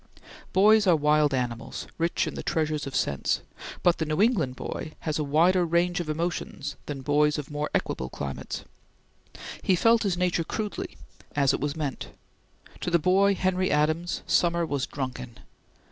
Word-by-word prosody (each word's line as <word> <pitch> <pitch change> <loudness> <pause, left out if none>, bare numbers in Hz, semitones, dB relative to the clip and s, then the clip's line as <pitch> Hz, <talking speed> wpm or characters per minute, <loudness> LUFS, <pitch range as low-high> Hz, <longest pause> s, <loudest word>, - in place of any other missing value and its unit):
Boys 210 +2 +5
are 175 - +6
wild 150 -1 +3
animals, 120 -3 -3
rich 170 +1 +1
in - - -4
the - - -5
treasures 155 -2 -1
of 135 - -6
sense, 70 - 0 0.4
but 175 -1 +3
the 160 - 0
New 155 +2 -1
England 195 - +2
boy 155 - -6
had 155 -1 -2
a - - +1
wider 170 +6 +3
range 175 +2 +1
of 170 -3 -4
emotions 155 -3 -3
than 140 -2 -4
boys 150 +2 +3
of 150 -1 -6
more 150 +1 -2
equable 65 - -1
climates. 70 -2 -5 1.0
He 190 - +3
felt 230 +5 +4
his 195 -5 0
nature 180 -2 +1
crudely, 210 +5 -4 0.4
as 140 -2 +3
it - - -1
was 145 +1 -2
meant. 145 -5 -3 0.7
To - - -2
the 170 - +4
boy 195 +4 +3
Henry 185 0 +1
Adams, 155 +4 0
summer 170 -1 +2
was 140 -4 -2
drunken. 130 -3 -5
155 Hz, 165 wpm, -27 LUFS, 145-180 Hz, 1.0 s, are